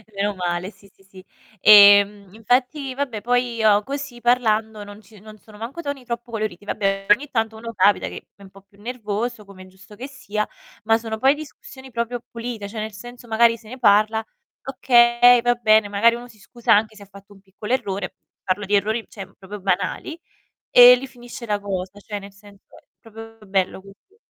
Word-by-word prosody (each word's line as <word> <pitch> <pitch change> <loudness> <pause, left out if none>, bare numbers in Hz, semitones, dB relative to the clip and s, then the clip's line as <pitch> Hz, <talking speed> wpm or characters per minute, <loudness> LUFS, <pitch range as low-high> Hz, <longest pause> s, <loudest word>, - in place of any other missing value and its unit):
Meno 205 +1 -1
male, 180 +2 -3
sì, 200 -2 -22
sì, 195 - -27
sì. 190 -1 -16 0.4
Ehm, 200 -1 +6
infatti, 255 +5 -1
vabbè 255 -7 -4
poi 245 +1 0
io 210 -2 +3
così 275 -2 -7
parlando 220 -3 0
non 205 +1 -12
ci 210 0 -19
non 215 +1 -14
sono 210 0 -18
manco 265 +9 -7
toni 285 -4 -6
troppo 235 0 -6
coloriti. 210 -3 -5
Vabbè, 195 -2 -2
ogni 275 +7 +3
tanto 225 -3 -2
uno 230 +1 -8
capita 200 +1 +2
che - - -10
è - - -23
un 195 - -14
po' 195 0 -18
più 200 +1 -24
nervoso, 225 -1 -5
come 195 -1 -14
è 185 - -15
giusto 190 +3 -17
che 255 +5 -8
sia, 215 -6 -4 0.4
ma 225 0 +3
sono 225 -1 -6
poi 270 +4 +3
discussioni 265 -3 -12
proprio 235 0 -4
pulite, 230 -3 -6
cioè 215 +1 -8
nel 220 +1 -5
senso 240 +3 -12
magari 230 +1 +3
se 220 -1 -19
ne 255 - -9
parla 215 0 +3 0.4
"Okay, 245 -2 +4
va 245 - +3
bene". 220 -3 +3
Magari 230 +4 +3
uno 240 +1 -9
si 220 -3 -19
scusa 240 +3 0
anche 215 +1 +1
se 205 - -13
ha - - -14
fatto 200 +1 -16
un 195 - -20
piccolo 200 +3 -9
errore, 195 -6 -3 0.3
parlo 195 +2 -2
di 205 - -4
errori, 220 +3 0
cioè 195 -3 -9
proprio 200 +2 -10
banali, 195 - -2 0.5
e 245 0 +9
lì 255 +2 -4
finisce 240 -1 -11
la 210 -1 -1
cosa, 195 -1 -6
cioè 205 0 -7
nel 200 0 -12
senso 200 0 -19
è - - -20 0.2
proprio 225 0 -13
bello 190 -1 -1
così. 200 - -20
215 Hz, 200 wpm, -21 LUFS, 200-240 Hz, 0.5 s, e